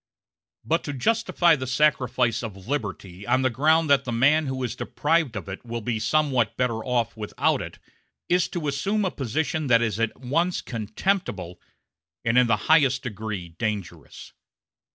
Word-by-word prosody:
But 165 +2 +1
to 145 - -3
justify 175 - +2
the 130 -3 -5
sacrifice 125 -4 +2
of 100 -5 -8
liberty 100 -7 -4
on 130 0 +2
the 130 - +2
ground 155 +6 +3
that 140 -1 +5
the 125 - -4
man 145 +6 +3
who 130 -1 -3
is 120 -1 -3
deprived 155 -2 0
of 100 - -5
it 95 0 -7
will 120 0 -4
be 115 0 -2
somewhat 130 -1 +1
better 115 -3 0
off 120 -3 -1
without 105 -2 0
it - - -8 0.5
is 180 0 +2
to 165 -4 -4
assume 195 +10 0
a 185 - 0
position 150 +4 -2
that 120 -2 +4
is 110 -2 -1
at 115 0 -1
once 165 +8 0
contemptible 110 - -3 0.6
and 115 +1 +2
in 125 -1 +5
the 115 -2 +3
highest 140 -5 +4
degree 105 -6 -5
dangerous. 100 0 -5
125 Hz, 165 wpm, -25 LUFS, 110-150 Hz, 0.6 s, that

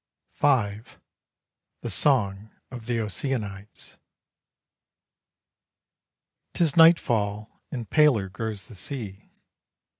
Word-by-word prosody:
V. 110 -8 +1 1.0
THE - - -5
SONG 105 -7 +1 0.2
OF 120 -3 -9
THE 120 -2 -1
OCEANIDES. 105 -2 -5 2.6
'Tis 165 -5 +2
nightfall 110 -11 +3
and 120 -5 -5
paler 145 -11 +3
grows 105 -1 -4
the - - -13
sea. 105 -2 -7
110 Hz, 80 wpm, -25 LUFS, 100-135 Hz, 2.6 s, nightfall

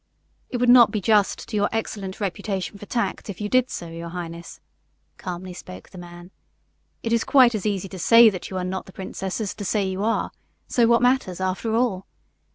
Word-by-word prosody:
"It 245 - -2
would 245 0 +1
not 245 -2 +8
be 215 - -2
just 205 0 +2
to 220 - -5
your 205 0 +2
excellent 205 -4 -4
reputation 200 0 -3
for 205 - -10
tact 235 -2 -2
if 190 - -6
you 210 - -2
did 255 +2 +2
so, 170 - -6
your 165 +1 -7
highness," 170 -1 -7 0.6
calmly 180 0 -6
spoke 95 - -11
the 185 - -10
man. 175 +1 -11 0.7
"It 230 - -1
is 230 - +2
quite 255 -4 +5
as 215 -1 -2
easy 195 -2 -2
to 190 - -8
say 230 +5 +7
that 185 - -7
you 190 - -4
are 185 - -2
not 185 +1 -4
the 190 - -13
princess 190 0 -5
as 210 -3 -3
to 205 - -7
say 205 0 0
that 190 - -2
you 190 +2 -3
are, 225 +1 0 0.4
so 235 -2 +3
what 235 0 +4
matters, 245 -8 +1
after 190 +4 -1
all? 220 -6 0
200 Hz, 215 wpm, -23 LUFS, 185-225 Hz, 0.7 s, not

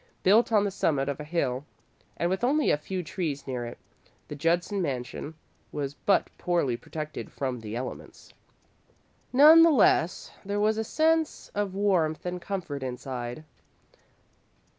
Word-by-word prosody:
Built 220 +5 +5
on 210 -2 +4
the 200 - -1
summit 145 -7 0
of 140 0 -3
a - - -5
hill 140 -5 -1 0.5
and 170 - 0
with 190 +4 -2
only 290 +4 +3
a - - +3
few 185 +4 -4
trees 155 -5 -4
near 125 -3 -3
it, 120 - -9 0.5
the 150 - -5
Judson 175 +6 0
mansion 140 +1 -4 0.4
was 140 -1 -3
but 195 +6 +1
poorly 170 -9 +1
protected 155 +5 -7
from 130 -3 -3
the 110 0 -6
elements. 125 +2 -7 1.0
None 305 +5 +8
the 335 - +7
less, 205 - +3
there 200 +1 -2
was 215 +1 +2
a - - 0
sense 320 +5 +1
of 200 -2 -2
warmth 180 -7 +1
and 180 0 -3
comfort 170 -7 -4
inside. 125 +1 -5
170 Hz, 150 wpm, -27 LUFS, 140-205 Hz, 1.0 s, None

